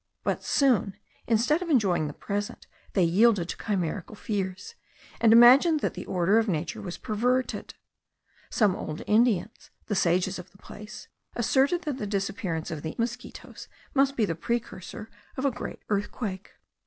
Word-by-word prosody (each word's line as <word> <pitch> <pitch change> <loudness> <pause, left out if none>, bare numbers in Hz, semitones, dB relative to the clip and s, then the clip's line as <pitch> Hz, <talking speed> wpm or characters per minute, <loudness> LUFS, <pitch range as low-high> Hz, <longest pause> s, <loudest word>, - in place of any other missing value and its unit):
But - - -1
soon, 245 -8 +2 0.3
instead 240 +9 +2
of 355 - -4
enjoying 190 - +2
the 145 - -6
present, 205 +5 -4 0.3
they 190 - +3
yielded 185 +1 +3
to - - -3
chimerical 195 -1 -3
fears, 200 - -4 0.5
and 225 - +5
imagined 265 +7 +7
that - - -1
the - - -8
order 190 +4 +3
of 225 - 0
nature 165 -3 -2
was 180 -3 -6
perverted. 245 +4 -1 0.7
Some 205 -5 +2
old 155 -3 -6
Indians, 220 -2 +1 0.2
the 210 - -3
sages 185 0 +1
of 180 - -11
the 195 - -20
place, 210 +1 -11 0.3
asserted 270 +8 +2
that 285 -3 -3
the 210 - -3
disappearance 195 -4 -3
of 155 -3 -5
the 160 +1 -5
insects 240 +1 -6 0.3
must 275 0 +2
be 225 - +3
the 165 - -2
precursor 215 +2 -4 0.3
of 260 - -2
a 275 - +3
great 245 - -7
earthquake. 205 -1 -3
210 Hz, 155 wpm, -27 LUFS, 185-240 Hz, 0.7 s, imagined